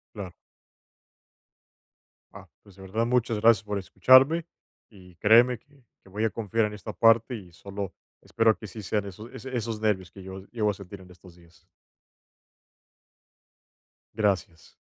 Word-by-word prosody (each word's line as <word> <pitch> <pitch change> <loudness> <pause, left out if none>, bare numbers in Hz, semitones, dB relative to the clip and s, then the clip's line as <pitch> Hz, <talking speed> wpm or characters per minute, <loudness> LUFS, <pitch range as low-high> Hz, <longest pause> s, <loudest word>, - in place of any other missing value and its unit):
Claro. 95 -4 -7 2.0
Ah, - - -13
pues 100 - -19
de 95 - -15
verdad, 105 +5 -2
muchas 120 -2 0
gracias 115 0 +4
por 105 -1 -3
escucharme 135 - +4 0.4
y 90 -4 -17
créeme 115 +5 +5
que 140 0 -27 0.2
que - - -18
voy 105 +3 -3
a 115 - +2
confiar 115 0 -1
en 105 - -8
esta 105 +1 -8
parte, 115 +2 +4
y 95 -6 -11
solo 100 +3 -7 0.3
espero 115 -1 +2
que 110 - -10
sí 105 +3 -9
sean 105 0 -2
eso 105 +4 -9
ese 130 +2 -8
esos 115 -2 -4
nervios 95 -5 0
que 95 -1 -12
yo 95 0 -8
llego 110 -2 0
a - - 0
sentir 100 0 -11
en 90 -1 -15
estos 90 0 -17
días. 85 0 -23 2.5
Gracias. 95 -6 -2
105 Hz, 155 wpm, -26 LUFS, 95-115 Hz, 2.5 s, créeme